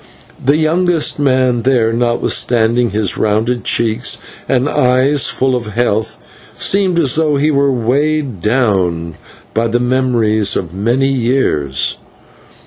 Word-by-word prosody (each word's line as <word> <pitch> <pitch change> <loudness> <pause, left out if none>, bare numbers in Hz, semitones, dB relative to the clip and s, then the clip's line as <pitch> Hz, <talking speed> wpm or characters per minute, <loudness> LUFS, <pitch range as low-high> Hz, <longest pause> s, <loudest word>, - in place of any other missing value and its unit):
The 140 +3 +2
youngest 165 0 +1
man 130 -3 +1
there, 115 -2 +1
notwithstanding 120 0 +1
his 105 -1 -2
rounded 110 +3 0
cheeks 115 +1 0 0.3
and 130 +1 +1
eyes 130 +1 +2
full 130 0 0
of 115 -4 -5
health, 110 -2 -1 0.4
seemed 190 -3 +1
as 140 -7 +2
though 155 -2 +1
he 150 +2 +1
were 140 -1 +2
weighed 135 - -1
down 95 -8 0 0.4
by 115 +1 0
the 120 +2 0
memories 120 -5 +1
of 85 -2 -4
many 120 +8 0
years. 115 - -1
125 Hz, 125 wpm, -14 LUFS, 110-135 Hz, 0.4 s, The